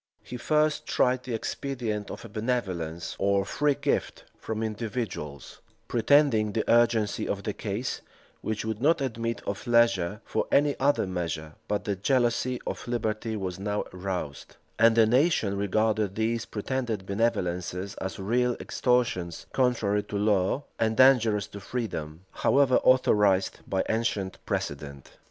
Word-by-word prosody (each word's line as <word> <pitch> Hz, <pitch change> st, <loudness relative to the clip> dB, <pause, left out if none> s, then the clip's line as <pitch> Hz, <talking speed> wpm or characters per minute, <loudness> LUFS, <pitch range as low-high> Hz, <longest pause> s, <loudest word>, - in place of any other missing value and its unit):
[*] -, -, -40 dB
He -, -, -8 dB
first 150 Hz, +4 st, +1 dB
tried 125 Hz, 0 st, +1 dB
the 125 Hz, -3 st, -2 dB
expedient 110 Hz, -4 st, -3 dB
of -, -, -8 dB
a -, -, -9 dB
benevolence, 95 Hz, -8 st, -3 dB
or 100 Hz, 0 st, +2 dB
free 145 Hz, +7 st, +1 dB
gift, 145 Hz, 0 st, -1 dB
from 110 Hz, 0 st, -4 dB
individuals; 105 Hz, -, -5 dB, 0.3 s
pretending 115 Hz, -3 st, +3 dB
the 110 Hz, -, -1 dB
urgency 115 Hz, -3 st, +3 dB
of 100 Hz, 0 st, -3 dB
the 105 Hz, -, -2 dB
case, 105 Hz, +5 st, -3 dB, 0.4 s
which 110 Hz, 0 st, -3 dB
would 110 Hz, 0 st, -3 dB
not 160 Hz, +4 st, +4 dB
admit 115 Hz, -3 st, -3 dB
of -, -, -4 dB
leisure 115 Hz, -5 st, +3 dB
for -, -, -1 dB
any 145 Hz, 0 st, +4 dB
other 140 Hz, -3 st, +2 dB
measure: 85 Hz, -4 st, -4 dB
but 105 Hz, 0 st, -1 dB
the 100 Hz, -, -1 dB
jealousy 125 Hz, +3 st, +1 dB
of -, -, -5 dB
liberty 110 Hz, -1 st, -2 dB
was 95 Hz, -3 st, -4 dB
now 105 Hz, +1 st, -1 dB
roused, 90 Hz, -6 st, -5 dB, 0.2 s
and 115 Hz, 0 st, +6 dB
the 115 Hz, -1 st, +6 dB
nation 125 Hz, -, +2 dB
regarded 105 Hz, 0 st, 0 dB
these 110 Hz, +1 st, 0 dB
pretended 115 Hz, -2 st, -3 dB
benevolences 95 Hz, -3 st, -1 dB
as 95 Hz, 0 st, -4 dB
real 120 Hz, +5 st, +1 dB
extortions, 120 Hz, -9 st, 0 dB
contrary 115 Hz, -6 st, +2 dB
to 100 Hz, -, -5 dB
law, 100 Hz, +5 st, +1 dB, 0.2 s
and 110 Hz, 0 st, +1 dB
dangerous 115 Hz, -6 st, +5 dB
to 100 Hz, -, -10 dB
freedom, 90 Hz, -9 st, -4 dB
however 135 Hz, -2 st, +3 dB
authorized 105 Hz, -7 st, +3 dB
by 95 Hz, -1 st, 0 dB
ancient 110 Hz, -4 st, -2 dB
precedent. 70 Hz, -1 st, -4 dB
110 Hz, 140 wpm, -27 LUFS, 100-120 Hz, 0.4 s, and